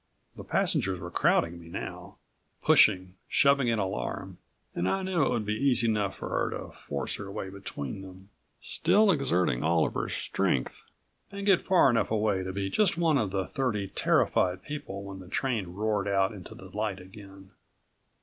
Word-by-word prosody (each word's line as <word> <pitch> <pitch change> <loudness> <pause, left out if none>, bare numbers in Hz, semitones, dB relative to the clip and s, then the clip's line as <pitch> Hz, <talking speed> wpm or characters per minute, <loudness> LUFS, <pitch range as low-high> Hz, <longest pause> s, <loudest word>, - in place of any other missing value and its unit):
The - - -9
passengers 95 -2 0
were 90 -1 -7
crowding 85 0 +2
me 85 - -13
now, 85 - -7 0.5
pushing, 95 -2 +4
shoving 140 -2 +3
in 115 -1 +2
alarm, 95 -2 -4 0.3
and 90 +2 -1
I 195 - 0
knew 185 -4 +1
it - - +2
would 115 -4 -1
be 105 - -1
easy 120 0 +2
enough 105 -3 0
for - - -6
her - - 0
to - - -9
force 70 -1 -4
her 100 -1 -7
way 95 -1 -5
between 95 -4 -6
them, 95 +1 -12 0.3
still 210 0 +3
exerting 90 - +1
all 80 0 +3
of - - -3
her - - -2
strength 65 - -2 0.4
and 200 0 -6
get 195 -3 +3
far 185 -6 +5
enough 115 -5 +2
away 105 -3 +1
to 95 0 -4
be 100 +1 -2
just 185 - +2
one 165 -4 +3
of 105 -5 0
the 95 0 -1
thirty 105 -7 -2
terrified 90 -1 +1
people 100 -10 -6
when 100 -1 -8
the 90 - -11
train 115 -1 -1
roared 100 +2 -1
out 95 -1 +2
into 95 -5 -10
the 95 +1 -13
light 105 -2 -2
again. 95 0 -13
100 Hz, 180 wpm, -28 LUFS, 95-120 Hz, 0.5 s, far